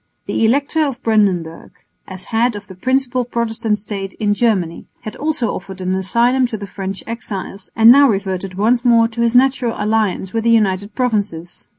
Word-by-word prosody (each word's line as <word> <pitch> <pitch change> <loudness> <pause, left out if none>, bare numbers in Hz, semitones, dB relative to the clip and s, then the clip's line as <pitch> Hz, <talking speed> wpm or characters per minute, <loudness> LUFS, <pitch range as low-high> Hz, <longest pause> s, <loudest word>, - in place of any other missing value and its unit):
The - - -1
Elector 280 +6 +1
of 275 -5 -3
Brandenburg, 190 -7 0 0.4
as 185 -1 -9
head 230 +1 +2
of 205 0 -8
the 190 - -12
principal 255 +5 0
Protestant 225 -2 -2
State 195 -2 -6
in 210 -1 0
Germany, 205 -7 -1
had 215 - -7
also 290 -7 -2
offered 190 0 -8
an 185 0 -2
asylum 235 +7 +1
to 225 - -5
the 205 - -7
French 195 0 -6
exiles 205 -3 -6
and 225 +1 +7
now 280 +1 +6
reverted 195 -2 -2
once 230 +5 +1
more 230 -2 +4
to 235 +1 -4
his 235 +1 +1
natural 255 -2 +3
alliance 210 -3 -1
with 225 -1 -1
the 235 - +2
United 205 -2 +1
Provinces. 205 -9 -3
220 Hz, 180 wpm, -18 LUFS, 195-240 Hz, 0.4 s, and